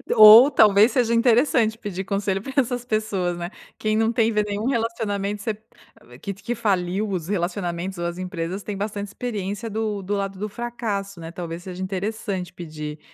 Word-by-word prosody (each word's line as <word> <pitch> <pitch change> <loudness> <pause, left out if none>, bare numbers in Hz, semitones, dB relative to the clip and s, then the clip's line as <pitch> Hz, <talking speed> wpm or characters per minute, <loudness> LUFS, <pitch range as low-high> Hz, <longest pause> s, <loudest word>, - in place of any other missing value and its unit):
Ou 220 +6 +10
talvez 215 -1 +6
seja 235 -2 +2
interessante 230 -1 +3
pedir 195 -4 -5
conselho 195 -1 -1
pra 265 +4 -7
essas 245 -2 +1
pessoas, 200 -6 -1
né, 175 0 -4 0.3
quem 215 0 0
não 225 0 +2
teve 220 -2 +2
nenhum 205 +3 -3
relacionamento 210 -4 -1
você 220 +1 -1 0.7
que 200 - -4
que 210 +5 -4
faliu 200 -1 0
os 180 -4 -3
relacionamentos 180 -1 -2
ou 170 - -3
as 175 +1 -3
empresas, 185 +1 -4
tem 200 0 -5
bastante 205 0 -3
experiência 210 -1 -4
do 215 -1 -2
do 205 +2 -1
lado 195 -1 -3
do 210 +1 -3
fracasso, 205 -5 -4
né, 165 0 -7
talvez 170 0 -6
seja 185 0 -7
interessante 195 -1 -3
pedir 155 -3 -7
205 Hz, 170 wpm, -23 LUFS, 185-220 Hz, 0.7 s, Ou